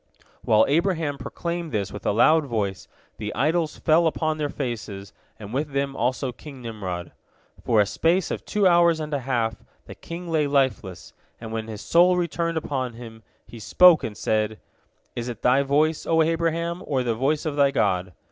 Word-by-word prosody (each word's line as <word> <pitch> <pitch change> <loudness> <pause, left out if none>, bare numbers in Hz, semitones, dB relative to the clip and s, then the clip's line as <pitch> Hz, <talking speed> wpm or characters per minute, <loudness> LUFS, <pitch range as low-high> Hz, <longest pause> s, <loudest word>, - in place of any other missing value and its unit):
" - - -33
While 110 0 +4
Abraham 160 -2 0
proclaimed 170 -1 -4
this 100 -4 -2
with 105 - -6
a - - +3
loud 155 +8 +4
voice, 100 -6 -3 0.3
the 105 -1 -4
idols 155 +2 0
fell 165 +1 +3
upon 155 -1 -1
their 145 -1 -1
faces, 110 -8 -5 0.2
and 105 +1 -9
with 145 +2 -2
them 140 0 -1
also 125 +2 -1
King 135 +2 -12
Nimrod. 95 -7 -6 0.5
For 115 -3 +2
a 105 - +5
space 165 - 0
of - - -4
two 210 -1 0
hours 170 -2 +4
and 155 -1 -5
a 140 - 0
half 120 -4 -1 0.3
the - - -9
king 170 +1 -8
lay 155 -3 +1
lifeless, 130 -10 -1 0.3
and 115 -1 -8
when 110 0 -4
his 110 -1 -7
soul 180 +2 +4
returned 170 -1 -1
upon 130 -5 -3
him, 115 -1 -11 0.2
he 115 +2 -12
spoke 180 +8 +5
and 105 -2 -5
said, 110 0 -1 0.6
"Is 120 +1 -4
it 120 -2 -8
thy 130 +3 +4
voice, 150 +3 +1
O 160 -1 +4
Abraham, 170 +1 -1
or 135 -3 0
the 120 -2 0
voice 140 +7 0
of 155 -2 -2
thy 140 -1 +4
God?" 90 -9 0
140 Hz, 185 wpm, -24 LUFS, 110-160 Hz, 0.6 s, a